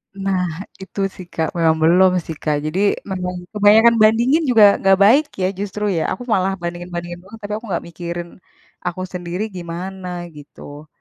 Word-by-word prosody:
Nah. 195 -2 -1 0.4
Itu 190 +1 -9 0.2
sih, 185 - -9
Kak, 160 -1 -1
memang 160 -1 +3
belum 180 +3 +5
sih, 160 - -6
Kak. 150 -2 +1
Jadi, 155 +5 -2 0.3
memang 180 -1 -3 0.2
kebanyakan 215 +3 +6
bandingin 235 +8 +4
juga 225 -4 +6 0.2
nggak 195 0 +4
baik 270 +9 +6 0.2
ya, 185 - +2
justru 205 +1 -4
ya? - - +1
Aku 245 - -7
malah 190 -1 +1
bandingin-bandingin 175 0 -5
mulu, 195 +4 -13
tapi 205 0 -6
aku 225 - -10
nggak 175 - -2
mikirin, 170 0 -6 0.6
aku 180 +1 -3
sendiri 180 +2 -4
gimana, 180 +2 -6 0.3
gitu. 145 +1 -12
185 Hz, 165 wpm, -19 LUFS, 170-205 Hz, 0.6 s, kebanyakan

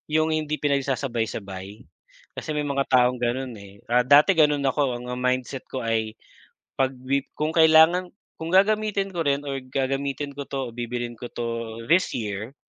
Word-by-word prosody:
'Yung 155 0 +2
hindi 155 -1 -1
pinagsasabay-sabay, 115 -8 -2 0.5
kasi - - -7
may 150 -1 -1
mga 140 -1 0
taong 125 0 +4
ganun, 125 +1 -2
eh. 100 0 -14
Ah, 125 +1 +4
dati 145 +8 +6
ganun 150 -3 +3
ako, 135 -1 +1
ang 125 - -9
mindset 125 +1 -1
ko 130 - -4
ay 110 -1 -1 0.6
'pag 135 0 +1 0.2
lib 140 0 +1
kung 155 +1 0
kailangan 160 +3 +6 0.3
kung 160 - -4
gagamitin 200 0 +2
ko 170 - 0
rin 140 0 +1
or 135 -1 -3
gagamitin 135 +2 -2
ko 140 - -4
'to 135 -3 -3
o - - -17
bibilhin 120 0 -4
ko 120 - -7
'to 115 -1 -4
this 180 +6 +3
year, 110 +2 -5
135 Hz, 165 wpm, -24 LUFS, 120-150 Hz, 0.6 s, dati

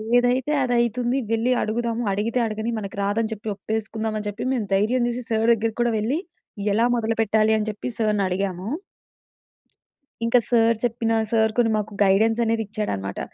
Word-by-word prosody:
ఏదైతే 245 +3 +2
అదయితుంది 240 0 +1
వెళ్లి 230 +2 +1
అడుగుదాము, 230 +2 -1
అడిగితే 215 +5 0
అడగని, 220 +1 -3
మనకి 200 -2 -7
రాదని 220 +3 0
చెప్పి 215 0 -6
ఒప్పేసుకుందామని 220 +1 -3
చెప్పి, 205 +4 -5
మేము 235 -5 -1
ధైర్యం 235 +5 +2
చేసి 245 +1 -3
సార్ 225 0 +1
దెగ్గరకి 225 0 -2
కూడా 240 -1 +2
వెళ్లి, 245 +9 0 0.5
ఎలా 230 +3 +3
మొదలు 225 -1 -1
పెట్టాలి, 220 0 +3
అని 215 0 -2
చెప్పి 210 +3 -5
సార్‌నడిగాము. 195 -3 -1 1.6
ఇంక 230 +2 +4
సార్ 230 -1 +4
చెప్పిన 230 -1 0 0.2
సార్ 220 -1 +3
కొన్ని 235 -2 +3
మాకు 210 0 -3
గైడెన్సనేదిచ్చాడనమాట. 210 - +1
225 Hz, 140 wpm, -23 LUFS, 210-235 Hz, 1.6 s, ఇంక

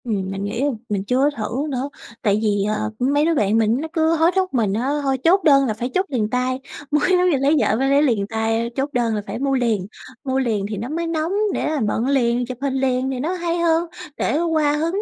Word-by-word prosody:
Ừm, 195 -5 -2
mình 195 0 -4
nghĩ 205 +6 -2 0.3
mình 200 -2 -1
chưa 255 +7 +2
thử 230 +5 -2
nữa, 270 0 -3 0.3
tại 205 -1 +2
vì, 205 -2 +1
à, 215 0 -1 0.2
mấy 285 +4 +2
đứa 335 - +2
bạn 210 -4 +2
mình 225 +1 +2
nó 320 - -4
cứ 320 0 +2
hối 325 +2 +3
thúc 375 -3 0
mình 220 -6 +1
á, 240 +6 -1
thôi 270 -1 +1
chốt 375 +4 +4
đơn 275 -3 +5
là 225 - 0
phải 240 +4 -4
chốt 375 +1 +1
liền 225 -6 -1
tay, 255 +2 -1 0.3
mới 300 +3 +2
giống 360 0 +4
như 300 - +2
lấy 275 +2 +2
vợ 210 - +2
phải 270 +1 +1
lấy 280 +1 +4
liền 225 -8 +1
tay, 225 +1 -1
chốt 270 +2 0
đơn 235 -3 +1
là 210 - -2
phải - - -5
mua 275 0 0
liền. 225 -7 0 0.4
Mua 265 -1 0
liền 220 -6 0
thì 210 - -4
nó 230 +6 -5
mới 335 +2 -2
nóng 325 +1 -1 0.2
để - - -1
là 310 -1 -1
bận 225 +4 -1
liền, 245 -3 +1
chụp 250 0 -7
hình 275 -1 -1
liền 260 -1 0
thì 260 - -4
nó 315 +7 -1
hay 345 -1 -2
hơn, 335 0 +2 0.3
để 290 - 0
qua 310 -3 +1
hứng 335 +6 -1
260 Hz, 250 wpm, -21 LUFS, 225-305 Hz, 0.4 s, đơn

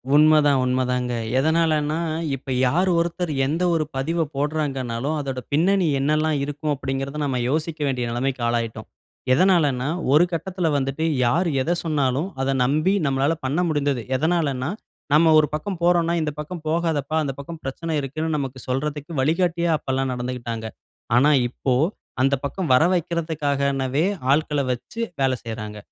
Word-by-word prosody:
உண்மதான், 150 -2 +5
உண்ம 130 0 +1
தாங்க. 125 -1 -1 0.3
எதனாலன்னா, 155 0 +2 0.4
இப்ப 135 0 -8 0.2
யாரு 180 +8 +2
ஒருத்தர், 170 0 -1
எந்த 160 +6 -1
ஒரு 160 -2 +2
பதிவ 165 +5 -1
போட்றாங்கன்னாலும், 140 -2 -2
அதோட 135 -2 -3
பின்னணி 180 +3 +3
என்னெல்லாம் 155 +2 +1
இருக்கும் 145 +1 -3
அப்டின்கிறத 135 +1 -4
நம்ம 130 -3 -1
யோசிக்க 160 +2 -2
வேண்டிய 125 -3 -1
நெலமைக்கு 130 +1 -2
ஆளாயிட்டோம்! 115 -2 -2 0.5
எதனாலன்னா 145 -6 +3 0.3
ஒரு 155 +4 +7
கட்டத்துல 175 +1 -2
வந்துட்டு 135 +3 -2 0.2
யார் 170 +10 +2
எத 165 - -1
சொன்னாலும், 145 +1 0
அத 135 +1 +1
நம்பி, 155 +9 +2
நம்மலாள 140 +3 +1
பண்ண 145 +6 0
முடிந்தது. 145 -5 0
எதனாலன்னா, 145 -2 0 0.4
நம்ம 160 +2 +6
ஒரு 150 - +3
பக்கம் 170 +4 -3
போறோன்ன்னா, 170 -1 +3
இந்த 150 - -1
பக்கம் 155 +2 -6
போகாதப்பா 160 -3 0
அந்த 135 -2 -2
பக்கம் 160 +3 -8
பிரச்சனை 160 +5 -4
இருக்குன்னு 155 +3 -2
நமக்கு 130 -2 -4
சொல்றதுக்கு 150 +4 -3
வழிகாட்டியா 170 +2 +1
அப்பல்லாம் 135 -2 -2
நடந்துக்கிட்டாங்க. 120 -2 -4 0.5
ஆனா 145 +4 +5 0.2
இப்போ, 130 +1 -2 0.5
அந்த 135 +1 +3
பக்கம் 170 +1 -3
வர 125 - +6
வெக்றதுக்காகவே 145 -4 0 0.3
ஆட்கள 150 0 +2
வச்சு 125 - -6 0.2
வேல 135 -1 +3
செய்றாங்க. 110 -2 -6
145 Hz, 140 wpm, -23 LUFS, 135-160 Hz, 0.5 s, ஒரு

